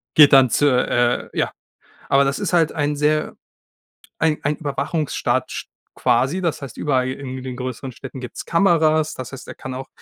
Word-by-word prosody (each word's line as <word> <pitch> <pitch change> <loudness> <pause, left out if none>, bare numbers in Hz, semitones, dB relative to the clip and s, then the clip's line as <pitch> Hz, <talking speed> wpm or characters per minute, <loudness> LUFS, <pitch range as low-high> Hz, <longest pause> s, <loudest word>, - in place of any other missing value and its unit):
geht 150 -2 +8
dann 135 -2 +7
zu, 145 - +3
äh, 120 -2 +1
ja. - - +1 0.6
Aber 135 0 +5
das 140 0 -1
ist 200 -3 -2
halt 165 -3 +3
ein 145 -1 0
sehr, 150 +1 +1 0.8
ein 160 -1 +2
ein 150 +1 +1
Überwachungsstaat 150 +1 -1
sch - - -5 0.3
quasi. 130 +8 +2
Das 165 -4 -1
heißt, 135 - -8
überall 130 -3 +1
irgendwie 130 0 -5
in 130 - -9
den 130 -1 -5
größeren 130 +1 -5
Städten 130 +1 -9
gibt's 125 -2 -7
Kameras. 160 -3 +3
Das 130 0 -7
heißt, 135 - -10
er - - -7
kann 130 - -7
auch 130 +1 -7
140 Hz, 185 wpm, -21 LUFS, 130-155 Hz, 0.8 s, geht